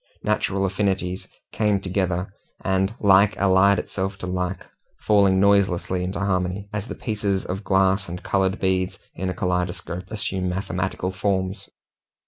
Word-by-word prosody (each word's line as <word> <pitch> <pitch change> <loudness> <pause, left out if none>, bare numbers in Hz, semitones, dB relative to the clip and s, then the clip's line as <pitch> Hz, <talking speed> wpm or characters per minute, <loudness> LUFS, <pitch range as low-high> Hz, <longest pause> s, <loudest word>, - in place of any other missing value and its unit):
Natural 95 +1 0
affinities 95 -1 -1 0.2
came 105 -2 +1
together, 95 -1 -2 0.3
and 95 +2 +1
like 100 +1 +5
allied 100 +1 +4
itself 95 0 -3
to 90 - -6
like, 90 0 -3 0.4
falling 100 -3 +4
noiselessly 95 -2 +2
into 95 +2 -3
harmony, 95 0 -1
as 105 +1 -3
the - - -5
pieces 105 -4 -2
of 95 +3 -4
glass 95 0 +2
and 90 +3 -6
coloured 95 0 +1
beads 95 -1 0 0.2
in 95 +1 -3
a 90 - -3
kaleidoscope 90 -1 -2
assume 95 -3 -2
mathematical 95 0 -2
forms. 95 0 -2
95 Hz, 135 wpm, -23 LUFS, 90-100 Hz, 0.4 s, like